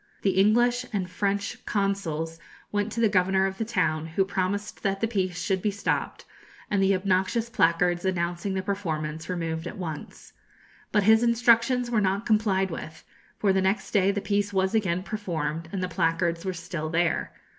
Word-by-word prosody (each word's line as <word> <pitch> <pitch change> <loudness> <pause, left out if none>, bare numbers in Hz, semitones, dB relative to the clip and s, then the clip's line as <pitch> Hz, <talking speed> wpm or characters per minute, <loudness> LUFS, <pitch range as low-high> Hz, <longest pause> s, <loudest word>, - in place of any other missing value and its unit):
The 195 - +3
English 240 +6 +3
and 195 -4 -1
French 200 +2 -2
consuls 165 -6 -1 0.3
went 205 +1 -1
to - - -3
the 230 - +5
governor 190 -1 +2
of 190 0 -3
the 225 - 0
town, 155 -8 0
who 180 +4 +1
promised 200 +1 -2
that 195 -1 0
the 225 - +1
piece 185 -5 -1
should 190 +1 0
be 210 - +1
stopped, 200 0 -2 0.5
and 200 -2 +2
the 195 0 +4
obnoxious 190 +5 0
placards 175 -2 +2
announcing 175 +1 -1
the 190 - -1
performance 160 -5 -3
removed 165 -2 -3
at - - -7
once. 160 -5 -7 0.6
But 210 -2 +3
his 220 +2 +6
instructions 240 +1 +3
were 220 -3 +2
not 195 +2 0
complied 200 -4 +2
with, 160 0 -7 0.3
for 200 -2 +2
the 190 - +2
next 190 +2 0
day 195 -2 +3
the 200 0 0
piece 205 0 0
was 190 0 +1
again 185 -5 +1
performed, 165 -6 -3
and 190 -2 -3
the - - 0
placards 170 0 0
were 185 - -1
still 165 -2 -5
there. 170 +1 0
190 Hz, 175 wpm, -26 LUFS, 175-205 Hz, 0.6 s, his